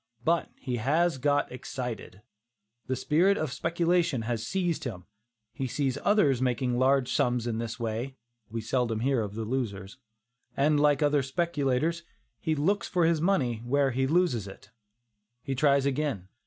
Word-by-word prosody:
But 170 +1 +2
he 125 -3 -4
has 150 +5 +1
got 145 +2 +1
excited; 125 -5 -6 0.6
the 130 - 0
spirit 175 +9 +3
of 155 -5 -2
speculation 170 -3 +1
has 115 -1 -2
seized 175 -4 -1
him; 100 -9 -6 0.5
he 130 +2 -3
sees 135 +1 -1
others 175 - +3
making 125 -1 0
large 130 0 +3
sums 120 -1 +1
in 115 -2 -2
this 115 +1 -4
way 115 +4 -3 0.3
(we 115 +1 -4
seldom 115 -1 -1
hear 130 -1 +2
of 105 -1 -5
the 110 0 -3
losers), 110 -4 -3 0.6
and 145 +1 +3
like 145 0 +3
other 145 -1 +3
speculators, 150 +1 0 0.4
he 160 -2 0
"looks 195 +8 +1
for 180 -2 +2
his 165 -2 +2
money 145 - +1
where 135 +4 +1
he 130 +2 0
loses 145 - +1
it." 100 +1 -13 0.7
He 135 - -2
tries 140 0 +3
again. 135 -9 -1
135 Hz, 155 wpm, -28 LUFS, 120-155 Hz, 0.7 s, spirit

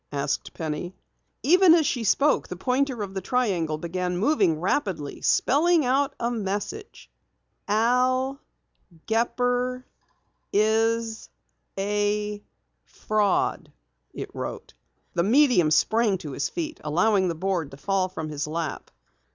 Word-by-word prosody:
asked 140 -1 -2
Penny. 160 +3 -4 0.5
Even 360 +1 +6
as 325 -3 +3
she 245 -4 -1
spoke 280 +7 +2
the - - -6
pointer 250 +3 -1
of 195 -1 -7
the 190 - -3
triangle 185 -9 0
began 180 +2 -3
moving, 195 - +2
rapidly 180 - -2
spelling 320 +2 +3
a 270 +2 +2 0.2
message. 215 - -5 0.6
"AL 255 +5 +1 0.6
GEPPER 245 +2 0 0.7
IS 225 +2 +1 0.5
A 205 +1 -1 0.4
FRAUD," 210 -2 -1 0.4
it - - -7
wrote. - - -6 0.4
The 170 - +1
medium 235 - +4
sprang 210 +6 +2
to 155 -5 -8
his - - -2
feet, 320 -2 -5
allowing 185 +5 +2
the 170 - -2
board 175 -3 -2
to 135 - -12
fall 190 +3 0
from 160 -4 -6
his 150 0 -3
lap. 160 -1 -4
210 Hz, 120 wpm, -25 LUFS, 180-250 Hz, 0.7 s, Even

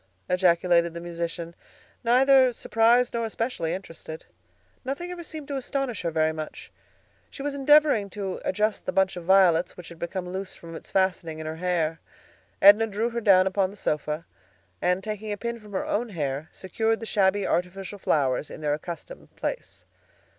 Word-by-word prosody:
ejaculated 175 -2 +3
the - - -4
musician, 170 0 -5 0.5
neither 260 +2 +5
surprised 235 +1 +3
nor 235 0 -1
especially 225 -6 -2
interested. 165 -4 -7 0.6
Nothing 285 +7 -4
ever 355 -1 -6
seemed 310 -3 -7
to 280 - -2
astonish 270 -2 -3
her 170 - -1
very 160 -1 +1
much. 155 -1 -7 0.6
She 275 - -8
was 290 0 -2
endeavoring 280 -6 +4
to 195 -2 -5
adjust 210 +3 -1
the - - +1
bunch 190 -1 +2
of 175 -2 -7
violets 180 -2 +4
which 180 - -10
had 170 -1 -12
become 180 +1 -4
loose 190 0 -5
from 165 0 -11
its 165 - -9
fastening 180 -4 0
in 160 - -6
her 160 +1 -4
hair. 165 -2 0 0.6
Edna 205 +3 +8
drew 220 +3 -1
her 235 0 -3
down 190 -4 +6
upon 190 0 +1
the 205 - -13
sofa, 150 -1 -2 0.6
and 180 +1 +1
taking 215 0 -4
a 205 - -2
pin 235 +2 -4
from 210 -2 -14
her 190 - -1
own 235 +3 -1
hair, 145 -4 -3
secured 220 +4 -1
the 225 - -6
shabby 200 -1 +2
artificial 190 +3 -2
flowers 140 -4 +1
in - - -9
their 150 -1 +1
accustomed 170 - -8
place. - - -5
190 Hz, 175 wpm, -26 LUFS, 170-225 Hz, 0.6 s, Edna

